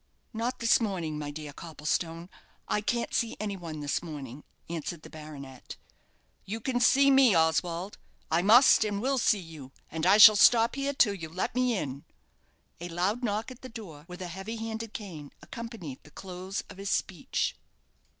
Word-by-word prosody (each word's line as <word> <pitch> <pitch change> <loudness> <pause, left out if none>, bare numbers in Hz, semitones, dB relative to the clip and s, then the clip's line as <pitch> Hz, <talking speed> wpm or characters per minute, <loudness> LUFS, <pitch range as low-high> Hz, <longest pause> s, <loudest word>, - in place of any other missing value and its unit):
"Not 230 +3 -2
this 230 0 +3
morning, 170 -8 -2
my 145 -1 -4
dear 145 0 -7
Copplestone; 165 +2 -3 0.4
I 210 - 0
can't 235 +2 -2
see 230 - -1
any 205 -1 -3
one 165 -5 -7
this 145 -1 -1
morning," 145 -5 -8 0.2
answered 165 -1 -5
the - - -12
baronet. 140 -4 -10 0.7
"You 220 +4 -5
can 245 +2 -1
see 275 +3 +5
me, 265 -6 +6
Oswald. 170 +4 0 0.3
I 165 +2 +3
must 225 +6 +7
and 205 -2 -2
will 265 +4 0
see 215 - +3
you, 160 -7 -10 0.2
and 160 +2 -1
I 195 +2 +6
shall 215 0 +10
stop 230 +3 +5
here 275 +1 -2
till 215 -6 +4
you 165 -5 -7
let 180 +4 -3
me 250 -2 +1
in." 140 -4 -5 0.8
A 175 +1 -6
loud 190 +8 -1
knock 220 +2 -2
at 255 - -12
the 255 - -9
door 180 -11 -10
with 180 +1 -8
a - - -5
heavy 190 +6 -6
headed 225 0 -5
cane 165 -9 -8
accompanied 225 - -8
the - - -17
close 185 +4 -6
of - - -12
his 195 0 -5
speech. 180 -4 -1
190 Hz, 180 wpm, -29 LUFS, 160-225 Hz, 0.8 s, shall